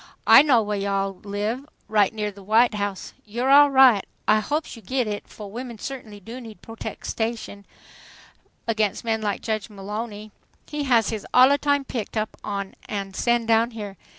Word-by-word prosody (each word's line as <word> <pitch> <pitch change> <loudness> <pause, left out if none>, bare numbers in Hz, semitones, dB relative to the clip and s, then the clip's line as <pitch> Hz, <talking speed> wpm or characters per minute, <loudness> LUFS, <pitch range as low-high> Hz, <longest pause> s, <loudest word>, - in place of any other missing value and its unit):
I 270 - +9
know 260 -6 +4
whah 210 0 -3
yo' 200 0 -1
all 195 0 0
live, 210 +5 -3 0.2
right 210 -2 +3
near 210 -1 -3
the 200 0 -14
White 220 +4 +3
House. 205 -2 -4
You's 225 +4 -4
alright. 265 -5 +6 0.2
I 215 0 +5
hopes 295 +9 -3
yo' 230 - -12
git 250 +5 -1
it, 210 -1 -5
fo' 210 - -10
women 235 +3 -7
certainly 220 -4 -7
do 230 +6 -9
need 225 -3 -12
protextion 225 -2 -5 1.0
against 215 -3 0
men 220 -1 0
like 205 -2 -2
Judge 215 -1 -2
Mullowny. 210 +1 -6 0.3
He 295 -1 -4
has 235 -4 +3
us 210 -2 -4
allatime 280 +2 +4
picked 225 -2 -4
up 215 0 -2
an' 200 0 -5
sen' 235 +3 +1
down 225 +1 +3
here. 205 -2 -6
220 Hz, 165 wpm, -24 LUFS, 205-240 Hz, 1.0 s, I